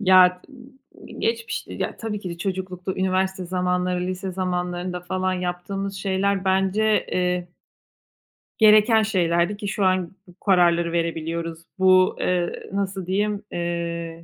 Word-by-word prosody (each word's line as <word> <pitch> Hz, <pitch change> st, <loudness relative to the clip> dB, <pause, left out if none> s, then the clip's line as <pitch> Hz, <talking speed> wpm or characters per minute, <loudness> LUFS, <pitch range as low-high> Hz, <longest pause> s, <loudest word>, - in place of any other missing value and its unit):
Ya, 185 Hz, -2 st, +5 dB
i 265 Hz, -1 st, -16 dB
i -, -, -11 dB
geçmiş, 230 Hz, 0 st, -2 dB
ya, -, -, -4 dB
tabii 215 Hz, -2 st, -4 dB
ki 185 Hz, -3 st, -5 dB
de 170 Hz, -, -7 dB
çocuklukta, 185 Hz, -1 st, -3 dB
üniversite 190 Hz, 0 st, 0 dB
zamanları, 180 Hz, 0 st, 0 dB
lise 185 Hz, +1 st, -4 dB
zamanlarında 180 Hz, -1 st, -2 dB
falan 185 Hz, +1 st, -1 dB
yaptığımız 185 Hz, +2 st, -3 dB
şeyler 195 Hz, 0 st, 0 dB
bence, 195 Hz, +3 st, +2 dB
eee 180 Hz, -1 st, 0 dB, 1.1 s
gereken 215 Hz, +1 st, +6 dB
şeylerdi 175 Hz, -1 st, +1 dB
ki 205 Hz, -, -5 dB
şu 200 Hz, -1 st, 0 dB
an 185 Hz, -2 st, +1 dB, 0.2 s
bu 180 Hz, +1 st, -18 dB
kararları 170 Hz, -3 st, +4 dB
verebiliyoruz. 165 Hz, 0 st, -2 dB, 0.2 s
Bu, 185 Hz, 0 st, +5 dB
eee, 175 Hz, -1 st, -1 dB
nasıl 195 Hz, -2 st, -2 dB
diyeyim, 205 Hz, +2 st, -1 dB
eee, 170 Hz, -1 st, -3 dB
185 Hz, 130 wpm, -23 LUFS, 175-195 Hz, 1.1 s, gereken